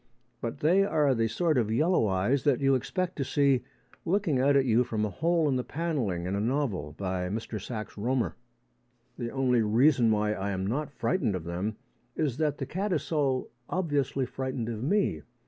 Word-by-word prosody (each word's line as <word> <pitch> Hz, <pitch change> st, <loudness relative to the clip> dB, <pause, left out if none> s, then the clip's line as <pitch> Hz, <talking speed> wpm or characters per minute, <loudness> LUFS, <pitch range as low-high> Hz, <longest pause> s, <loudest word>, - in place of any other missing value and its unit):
But 115 Hz, -, -4 dB
they 180 Hz, +6 st, +4 dB
are 150 Hz, -8 st, +2 dB
the 115 Hz, -2 st, +1 dB
sort 155 Hz, +5 st, +1 dB
of 110 Hz, -2 st, 0 dB
yellow 155 Hz, +1 st, +3 dB
eyes 100 Hz, +8 st, +1 dB
that 145 Hz, -4 st, +3 dB
you 135 Hz, -1 st, +3 dB
expect 180 Hz, +8 st, -1 dB
to 140 Hz, -, 0 dB
see 135 Hz, -1 st, +2 dB, 0.4 s
looking 170 Hz, -6 st, +1 dB
out 140 Hz, +2 st, +4 dB
at 135 Hz, -1 st, +4 dB
you 120 Hz, 0 st, +4 dB
from 110 Hz, -3 st, -1 dB
a 105 Hz, -, -3 dB
hole 165 Hz, -, +1 dB
in 135 Hz, -3 st, +1 dB
the 125 Hz, -, -1 dB
panelling 130 Hz, -, -2 dB
in 95 Hz, -, -2 dB
a 100 Hz, -, 0 dB
novel 110 Hz, -, -1 dB
by 90 Hz, -2 st, -2 dB
Mr 110 Hz, 0 st, -4 dB
Sax 110 Hz, -4 st, -5 dB
Rohmer. 120 Hz, +4 st, 0 dB, 0.9 s
The 120 Hz, -1 st, -2 dB
only 125 Hz, -2 st, +2 dB
reason 120 Hz, +3 st, +4 dB
why 105 Hz, -1 st, +2 dB
I 100 Hz, -1 st, -3 dB
am 95 Hz, -1 st, -2 dB
not 135 Hz, +8 st, -1 dB
frightened 140 Hz, -, 0 dB
of 90 Hz, -, -4 dB
them 90 Hz, +6 st, -3 dB, 0.4 s
is 145 Hz, -6 st, -1 dB
that 150 Hz, -2 st, 0 dB
the 135 Hz, -, -3 dB
cat 195 Hz, +8 st, -2 dB
is 165 Hz, -, 0 dB
so 140 Hz, -5 st, 0 dB, 0.2 s
obviously 145 Hz, -7 st, 0 dB
frightened 130 Hz, -2 st, -4 dB
of 110 Hz, -2 st, -4 dB
me. 150 Hz, -, +1 dB
130 Hz, 195 wpm, -28 LUFS, 110-150 Hz, 0.9 s, they